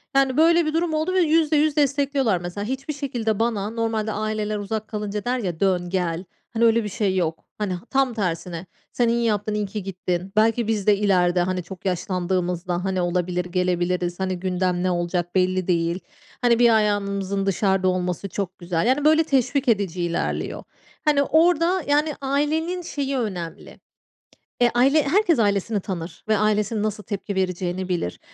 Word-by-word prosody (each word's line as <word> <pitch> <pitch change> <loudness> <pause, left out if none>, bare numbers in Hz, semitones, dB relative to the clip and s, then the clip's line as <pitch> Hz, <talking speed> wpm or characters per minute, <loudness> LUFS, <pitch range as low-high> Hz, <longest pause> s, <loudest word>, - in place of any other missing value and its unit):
yani, 270 -1 +3
böyle 335 +1 +5
bir 310 - -1
durum 330 0 0
oldu 315 +4 0
ve 375 - +3
%100 310 -2 +3
destekliyorlar. 280 -6 +2
Mesela 180 +3 -5
hiçbir 265 +5 -3
şekilde 245 -7 -2
bana 220 -3 0
normalde 225 -1 -1
aileler 215 0 -2
uzak 210 +1 -4
kalınca 210 -1 -4
der 250 +1 0
ya, 180 -7 -3
"Dön, 180 -2 +1
gel." 175 -2 -1 0.3
Hani, 230 0 +3
öyle 230 0 +4
bir 210 - -4
şey 195 -1 0
yok. 165 -3 -1
Hani, 205 -3 -2 0.2
tam 270 -2 +2
tersine 175 -4 -3 0.3
"Sen 240 - +1
iyi 235 0 +1
yaptın, 210 -1 0
iyi 210 0 -1
ki 200 +1 -5
gittin. 185 -1 -3
Belki 225 +1 +3
biz 215 -3 -1
de 205 -1 +5
ileride, 180 -3 +2
hani, 180 0 -1
çok 180 +2 -11
yaşlandığımızda, 180 -1 -1
hani, 190 -1 -1
olabilir, 180 0 -1
gelebiliriz. 180 0 -1
Hani, 185 -1 -2
gündem 180 -1 0
ne 185 - +1
olacak 175 0 -2
belli 185 0 +1
değil. 170 0 +1 0.4
Hani, 240 -2 +3
bir 240 -1 +6
ayağımızın 200 -2 0
dışarıda 195 -1 +1
olması 180 +1 -1
çok 190 0 -4
güzel." 175 +2 -1
Yani, 275 +4 +2
böyle, 315 +1 +5
teşvik 275 -1 +1
edici 200 -6 +1
ilerliyor. 170 0 -2 0.4
Hani, 290 -2 +4
orada, 335 +4 +3
yani, 295 +1 +2
ailenin 305 +6 0
şeyi 280 -5 -3
önemli. 185 -8 -5 0.8
Eee, 240 -1 +5
aile 275 +5 +4
herkes 340 - +2
ailesini 205 0 +1
tanır 180 -3 -6
ve 215 -1 +3
ailesinin 210 +1 +1
nasıl 215 0 -2
tepki 200 0 -4
vereceğini 185 0 -2
bilir. 170 - -2
205 Hz, 165 wpm, -23 LUFS, 180-255 Hz, 0.8 s, bir